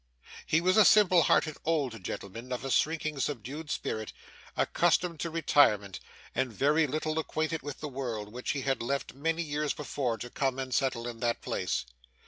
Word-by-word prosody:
He 160 - +3
was 185 +4 +3
a 215 - +9
simple 185 -3 +6
hearted 155 -1 +2
old 135 - -1
gentleman, 115 +7 -6
of 125 +1 -3
a 135 - -2
shrinking, 155 -1 +1
subdued 145 +4 -4
spirit, 110 -6 -3 0.4
accustomed 175 -1 +2
to 170 - -2
retirement, 140 - +3 0.3
and 130 -2 0
very 150 +8 +3
little 155 +3 -1
acquainted 160 0 -2
with 145 0 -7
the 150 - -3
world, 120 -7 -4
which 125 +1 -5
he 140 - -3
had 135 0 0
left 140 +4 -2
many 165 +4 -1
years 150 -1 -1
before 135 -5 -2
to 120 +1 -7
come 135 -2 0
and 130 -1 -4
settle 120 -2 0
in 120 -1 -6
that 120 0 -1
place. 65 - -1
140 Hz, 175 wpm, -30 LUFS, 120-155 Hz, 0.4 s, a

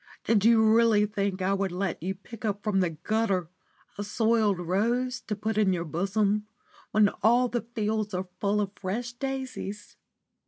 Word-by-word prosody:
Did 215 -3 +2
you 225 0 +6
really 220 -1 +5
think 200 -3 -2
I 190 +1 +2
would 195 -1 -1
let 185 -2 -2
you 190 +3 -2
pick 215 +4 -12
up 205 -2 -2
from 210 -3 +1
the 180 -2 +2
gutter 185 +1 -1 0.5
a - - -1
soiled 220 -1 +2
rose 235 +9 0
to 210 - -1
put 215 +1 -1
in 195 -3 +3
your 170 -1 -2
bosom 200 +6 0 0.4
when 210 -1 +4
all 240 +4 +4
the 240 -1 -1
fields 215 -1 -1
are 185 +1 -3
full 205 +1 +1
of 200 -1 -2
fresh 230 +6 -4
daisies? 255 -6 -5
210 Hz, 170 wpm, -27 LUFS, 195-225 Hz, 0.5 s, you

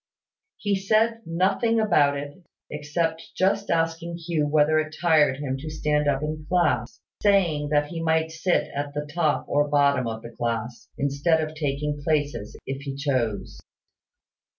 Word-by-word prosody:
He 205 -1 0
said 220 +4 +2
nothing 195 +7 +1
about 150 -10 +3
it, 145 +5 -8 0.3
except 160 +2 -2
just 195 +2 +1
asking 165 +1 -1
Hugh 165 -3 -1
whether 155 +1 +3
it 155 0 -3
tired 155 -6 +4
him 135 -2 -3
to 155 +3 -6
stand 150 -1 0
up 140 0 +1
in 155 0 -4
class, 180 -1 +1 0.2
saying 175 -8 +2
that 145 0 +2
he 165 -2 -5
might 160 0 +1
sit 165 +3 0
at 145 0 -4
the 150 0 -2
top 160 -3 +1
or 145 +1 +2
bottom 140 -3 +2
of 110 0 -5
the 115 - -8
class, 115 0 -4
instead 140 +4 +1
of 155 0 -3
taking 145 -1 -2
places, 145 -8 -1
if 135 +1 -4
he 140 -1 -5
chose. 130 -7 -2
150 Hz, 155 wpm, -25 LUFS, 140-165 Hz, 0.3 s, tired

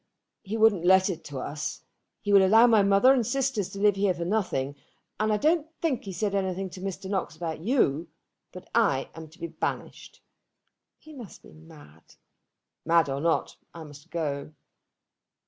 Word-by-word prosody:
"He 215 +3 -5
wouldn't 215 -6 +4
let 190 +2 +4
it 170 - -8
to 145 -2 -7
us; 150 +3 -5 0.4
he 205 - -1
will 195 -1 +7
allow 220 +5 +6
my 225 -3 +5
mother 200 +6 +5
and 255 -3 +1
sisters 260 -5 -1
to 195 - -8
live 205 -1 +3
here 195 -2 +1
for 170 0 -4
nothing; 170 -9 -1 0.4
and 215 0 +1
I 210 - +2
don't 315 +6 +1
think 295 -10 -1
he - - -6
has 180 - -8
said 205 +1 -1
anything 190 -1 -2
to 185 - -10
Mr. 195 0 -5
Knox 190 -4 -3
about 160 -1 -5
you. 170 - 0 0.4
But 180 0 -11
I 145 -13 +1
am 160 -1 -10
to 160 +3 -19
be 170 - -4
banished." 165 -1 -6 0.7
"He 310 - -15
must 240 -9 -11
be - - -15
mad." 155 - -17 0.7
"Mad 165 -2 +3
or 135 +1 -3
not, 165 +1 0 0.2
I 165 - -8
must 150 +2 -14
go." 150 -3 -4
190 Hz, 180 wpm, -27 LUFS, 160-215 Hz, 0.7 s, will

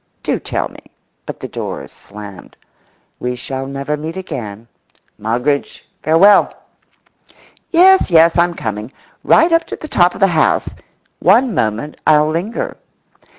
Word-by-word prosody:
Do - - -1
tell - - -3
me—but - - -14
the - - -5
doors - - -6
slammed. 100 -2 -12 0.6
We 125 0 -3
shall 135 +2 -5
never 140 +2 -3
meet 160 +4 -6
again. 115 - -7 0.5
Moggridge, 125 +7 -2 0.2
farewell! 175 +7 +5 1.2
Yes, 375 - +5
yes, 165 -1 +5
I'm 175 0 +2
coming. 110 -1 -5 0.3
Right 335 - +4
up 330 0 +3
to - - -6
the 310 - -9
top 180 -10 +2
of - - -9
the 195 - +5
house. 170 -5 +1 0.5
One 230 +6 +3
moment 115 - -2
I'll 150 -1 +5
linger. 175 +9 -3
155 Hz, 130 wpm, -16 LUFS, 125-190 Hz, 1.2 s, farewell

